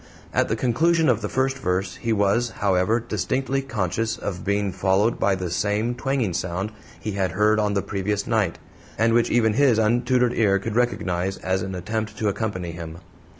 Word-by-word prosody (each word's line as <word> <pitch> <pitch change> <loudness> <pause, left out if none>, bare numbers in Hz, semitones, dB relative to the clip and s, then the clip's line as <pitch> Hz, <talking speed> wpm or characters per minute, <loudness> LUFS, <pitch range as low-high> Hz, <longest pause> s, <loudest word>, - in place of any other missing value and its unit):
At - - +2
the 110 - 0
conclusion 155 +7 +2
of 115 -2 +2
the 105 - -3
first 130 0 0
verse 90 0 -1
he 115 - -2
was, 105 +3 +2
however, 100 +3 +2
distinctly 130 +3 -1
conscious 115 -3 -2
of 95 -3 -5
being 100 0 0
followed 95 +5 +1
by 100 - +2
the 90 -2 -4
same 105 +5 0
twanging 125 -6 -1
sound 90 +4 -2 0.3
he 110 - -4
had 95 -3 -1
heard 105 +2 +3
on 105 -1 +1
the 100 - 0
previous 100 +1 -2
night, 110 -7 0 0.4
and 115 +1 +3
which 120 0 +3
even 110 -2 +3
his 130 -2 +4
untutored 120 +2 +2
ear 100 -4 +3
could 105 +2 -4
recognize 95 -6 0
as 95 0 -1
an 95 0 -4
attempt 110 +4 -3
to 110 - +1
accompany 95 -5 -3
him. 85 -1 -8
105 Hz, 185 wpm, -23 LUFS, 95-120 Hz, 0.4 s, his